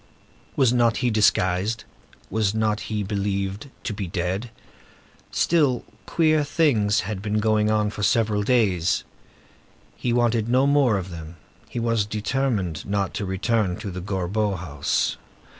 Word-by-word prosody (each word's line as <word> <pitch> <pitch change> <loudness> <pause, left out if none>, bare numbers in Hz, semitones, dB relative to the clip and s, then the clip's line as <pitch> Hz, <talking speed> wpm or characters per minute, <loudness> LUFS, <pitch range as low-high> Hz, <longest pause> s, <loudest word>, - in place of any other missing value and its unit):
Was 130 -4 +3
not 120 -2 +3
he 120 - +3
disguised? 105 0 +2 0.5
Was 110 -1 +1
not 110 -1 +1
he 105 -1 -1
believed 100 +3 -2
to 115 - -3
be 100 -2 -4
dead? 90 +6 -2 0.8
Still, 145 -7 +2 0.2
queer 155 -2 +3
things 120 -9 +2
had 100 0 -4
been 105 +1 -1
going 105 0 +2
on 105 -1 +1
for 105 - -6
several 110 -1 +2
days. 100 -7 +2 0.9
He 125 - -2
wanted 120 -2 +2
no 130 +2 +4
more 140 -6 +3
of 95 -1 -5
them. 80 0 -8 0.3
He - - -4
was 115 -3 +1
determined 105 - -1
not 100 -1 -1
to 100 - -3
return 95 0 0
to 100 - -6
the 90 0 -6
Gorbeau 100 +2 -1
house. 75 -5 -1
105 Hz, 140 wpm, -24 LUFS, 95-120 Hz, 0.9 s, no